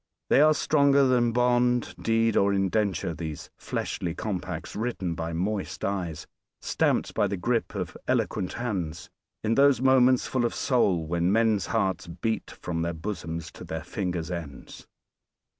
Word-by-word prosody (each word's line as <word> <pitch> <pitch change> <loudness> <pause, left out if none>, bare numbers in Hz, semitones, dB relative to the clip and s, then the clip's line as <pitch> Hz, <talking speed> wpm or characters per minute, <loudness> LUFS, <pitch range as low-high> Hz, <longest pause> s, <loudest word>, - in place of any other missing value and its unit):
They - - +6
are 155 0 +6
stronger 140 -2 +4
than 120 -2 +3
bond, 125 0 +2
deed 115 -1 +2
or 100 0 +3
indenture, 95 -2 0
these 80 -2 -6
fleshly 85 -1 -3
compacts 90 -6 -4
written 105 -6 -2
by 80 0 -4
moist 95 +4 -2
eyes, 90 -6 -3 0.3
stamped - - 0
by 105 - +2
the 100 0 -3
grip 115 +3 -1
of 90 -4 -4
eloquent 90 - 0
hands, 90 -10 -4 0.3
in 110 +1 +1
those 140 -1 +5
moments 130 -1 +4
full 130 -2 0
of 120 - 0
soul 100 -11 +2
when 85 +3 +1
men's 110 -2 +2
hearts 95 -3 0
beat 90 +7 -3
from 85 -1 -4
their 85 0 -2
bosoms 85 -2 -5
to - - -11
their - - -5
fingers' 90 -3 -3
ends. 80 -6 -8
100 Hz, 150 wpm, -27 LUFS, 85-120 Hz, 0.3 s, They